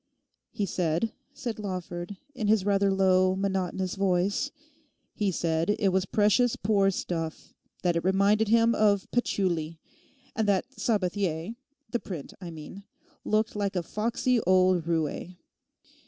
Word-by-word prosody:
'He 205 - -2
said,' 175 +3 -1 0.2
said 235 -4 -5
Lawford, 185 -1 -5 0.2
in 235 -6 -2
his 210 -2 +3
rather 200 -1 +3
low, 185 -1 +3
monotonous 190 -1 -1
voice, 195 +6 +1 0.6
'he 205 -2 0
said 165 +3 0
it 200 - +2
was 190 0 +1
precious 220 +3 +3
poor 200 -1 +2
stuff, 165 -4 -4 0.3
that 175 -2 +2
it 170 - 0
reminded 200 +4 +3
him 230 +1 +4
of 205 -3 +3
patchouli; 170 -9 -1 0.6
and 220 -2 0
that 200 0 +2
Sabathier—the 210 - -2
print 170 -11 -7
I 175 - -6
mean—looked 200 +6 -4
like 200 -1 -1
a 180 - 0
foxy 235 +6 0
old 185 -2 +3
roué. 165 +2 -2
195 Hz, 125 wpm, -28 LUFS, 180-210 Hz, 0.6 s, him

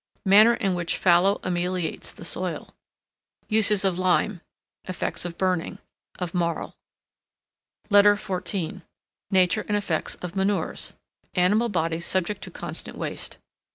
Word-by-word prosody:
Manner 215 +5 +7
in 195 -6 0
which 175 -1 -2
FALLOW 185 +3 +4
ameliorates 180 -1 -2
the - - -10
soil. - - -3 0.8
Uses 215 -2 +4
of 185 -2 +1
Lime. 185 0 +1 0.4
Effects 185 -1 -2
of 170 -1 -5
Burning. 185 -3 -1 0.4
Of 180 -2 -4
Marl. 170 -2 -1 1.2
LETTER 205 0 +7
XIV 190 -2 -4 0.5
NATURE 190 +1 +3
AND 210 - +1
EFFECTS 180 -6 -1
OF 180 +1 -8
MANURES. 195 +1 -1 0.4
Animal 205 +6 +3
bodies 165 -3 -1
subject 190 +2 0
to - - -9
constant - - -3
waste. - - -5
185 Hz, 120 wpm, -25 LUFS, 175-205 Hz, 1.2 s, Manner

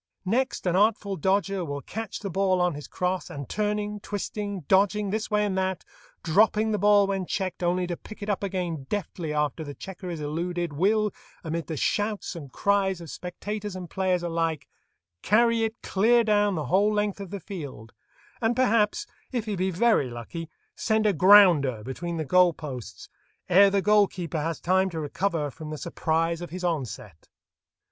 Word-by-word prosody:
Next 250 +6 0
an 180 -1 +1
artful 205 0 +2
dodger 195 +2 0
will 145 -3 -5
catch 225 +2 -6
the 200 -2 -4
ball 190 0 +2
on 180 -1 +2
his 145 0 -8
crosse, 180 0 -2
and 140 -2 -7
turning, 210 0 -2
twisting, 205 -1 -4
dodging 200 +4 +2
this 215 +1 -2
way 210 -1 +2
and 195 -2 -1
that, 190 -1 -2 0.4
dropping 215 +5 +3
the 210 - 0
ball 205 0 +5
when 195 -2 -2
checked, 185 -2 -3
only 180 +1 +1
to 175 -1 -3
pick 215 +4 -11
it - - -5
up 205 -2 -1
again 180 -8 -3
deftly 175 -5 -3
after 150 0 -1
the 145 -2 -8
checker 185 -1 -8
is 170 -2 -4
eluded, 170 +2 -3
will, 210 +7 +2 0.3
amid 165 0 -3
the 160 - -4
shouts 205 +4 -1
and 145 -6 -8
cries 195 0 +1
of 165 -3 -9
spectators 205 +3 -5
and 180 -2 -7
players 185 -2 0
alike, 165 -2 -1 0.5
carry 230 +2 +3
it 225 +1 -5
clear 230 +5 +3
down 205 -2 +2
the 155 -3 -2
whole 195 +9 +3
length 210 -1 -1
of 195 -2 -7
the 200 +2 -5
field, 145 - -8 0.5
and 230 +1 +2
perhaps, 230 -4 +2 0.3
if 240 -4 -2
he 210 -2 -2
be 185 +1 0
very 190 - +2
lucky, 120 +8 -7 0.3
send 220 -1 +1
a 210 - +4
"grounder" 170 - +6
between 170 +8 -4
the 160 - -2
goal 180 +2 +5
posts 125 -10 -8 0.4
ere 195 +3 +7
the 195 -1 +1
goal 210 -1 +5
keeper 170 -4 -4
has 165 +1 -2
time 190 +2 +2
to 165 -3 -5
recover 155 0 -1
from 155 +2 -9
the 155 - -5
surprise 165 +1 -1
of 175 - -6
his 185 +2 -7
onset. 130 - -4
185 Hz, 185 wpm, -26 LUFS, 165-205 Hz, 0.5 s, ere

